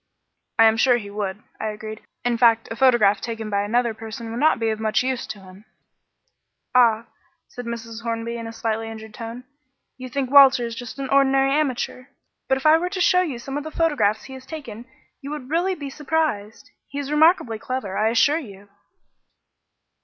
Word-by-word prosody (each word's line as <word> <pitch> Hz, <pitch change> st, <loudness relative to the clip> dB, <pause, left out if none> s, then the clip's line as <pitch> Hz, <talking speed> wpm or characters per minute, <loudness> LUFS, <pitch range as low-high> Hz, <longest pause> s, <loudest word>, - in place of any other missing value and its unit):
"I 225 Hz, -, +7 dB
am 220 Hz, 0 st, +4 dB
sure 245 Hz, +1 st, +4 dB
he 205 Hz, -3 st, -8 dB
would," 205 Hz, -1 st, -4 dB, 0.2 s
I 220 Hz, -, -2 dB
agreed. 215 Hz, 0 st, -7 dB, 0.2 s
"In 245 Hz, -1 st, +2 dB
fact, 230 Hz, -1 st, +4 dB
a -, -, -3 dB
photograph 230 Hz, -6 st, +4 dB
taken 225 Hz, -2 st, -5 dB
by 200 Hz, 0 st, +1 dB
another 235 Hz, +3 st, +1 dB
person 225 Hz, +1 st, -8 dB
would 230 Hz, -, -4 dB
not 310 Hz, +3 st, +4 dB
be 225 Hz, -1 st, 0 dB
of 215 Hz, -, -4 dB
much 220 Hz, +2 st, +1 dB
use 260 Hz, -1 st, -2 dB
to 215 Hz, -1 st, -7 dB
him." 190 Hz, +1 st, -15 dB, 1.1 s
"Ah," 235 Hz, -2 st, +4 dB, 0.4 s
said 245 Hz, -, -9 dB
Mrs. 230 Hz, -1 st, -6 dB
Hornby 230 Hz, 0 st, -3 dB
in 230 Hz, -1 st, -6 dB
a -, -, -6 dB
slightly 225 Hz, 0 st, -3 dB
injured 220 Hz, -1 st, -10 dB
tone, 230 Hz, +1 st, -7 dB, 0.6 s
"you 255 Hz, 0 st, -7 dB
think 265 Hz, 0 st, -2 dB
Walter 270 Hz, -3 st, +7 dB
is 230 Hz, -, -5 dB
just 230 Hz, 0 st, -8 dB
an 275 Hz, -1 st, -4 dB
ordinary 270 Hz, 0 st, +3 dB
amateur; 265 Hz, -3 st, -1 dB, 0.4 s
but 265 Hz, -, +2 dB
if 265 Hz, -, -8 dB
I 310 Hz, +1 st, +6 dB
were 355 Hz, +2 st, -2 dB
to 375 Hz, -, -5 dB
show 360 Hz, 0 st, +4 dB
you 305 Hz, -9 st, -3 dB
some 270 Hz, +4 st, -5 dB
of -, -, -7 dB
the 315 Hz, -, -6 dB
photographs 290 Hz, -11 st, +1 dB
he 265 Hz, -, -10 dB
has 260 Hz, 0 st, -11 dB
taken 240 Hz, -8 st, -8 dB, 0.4 s
you 280 Hz, -, -7 dB
would 295 Hz, -2 st, -7 dB
really 360 Hz, +3 st, +1 dB
be 285 Hz, -4 st, -7 dB
surprised. 290 Hz, -8 st, -2 dB, 0.2 s
He 280 Hz, -, -8 dB
is 285 Hz, 0 st, -4 dB
remarkably 300 Hz, -, +3 dB
clever, 255 Hz, -7 st, -4 dB
I 215 Hz, +1 st, +2 dB
assure 285 Hz, +7 st, +3 dB
you." 200 Hz, -7 st, -12 dB
235 Hz, 200 wpm, -23 LUFS, 220-275 Hz, 1.1 s, I